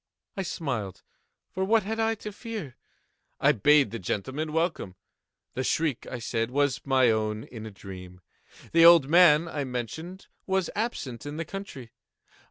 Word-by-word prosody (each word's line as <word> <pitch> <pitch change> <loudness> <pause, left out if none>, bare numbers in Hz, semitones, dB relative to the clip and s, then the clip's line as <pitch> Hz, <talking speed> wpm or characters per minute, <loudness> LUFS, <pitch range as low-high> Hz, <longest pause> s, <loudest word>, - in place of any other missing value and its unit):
I 195 - -2
smiled,—for 140 - -6
what 220 +3 +3
had 220 +3 -4
I 225 0 +1
to 210 - -4
fear? 210 - -7 0.6
I 140 - +5
bade 145 +4 +4
the 115 - -5
gentlemen 130 - -3
welcome. 160 - -1 0.6
The 130 - -2
shriek, 155 -2 -1
I 125 - -5
said, 115 -1 -2
was 140 +1 0
my 130 -3 +3
own 110 0 -1
in 110 -2 -9
a - - -7
dream. 90 -2 -11 0.5
The 165 0 +5
old 170 -4 +8
man, 170 -1 +6
I 150 -3 -3
mentioned, 135 - -6 0.2
was 190 -2 0
absent 145 - -4
in 145 +1 -6
the 165 - -3
country. 155 - -8
145 Hz, 155 wpm, -27 LUFS, 115-175 Hz, 0.6 s, old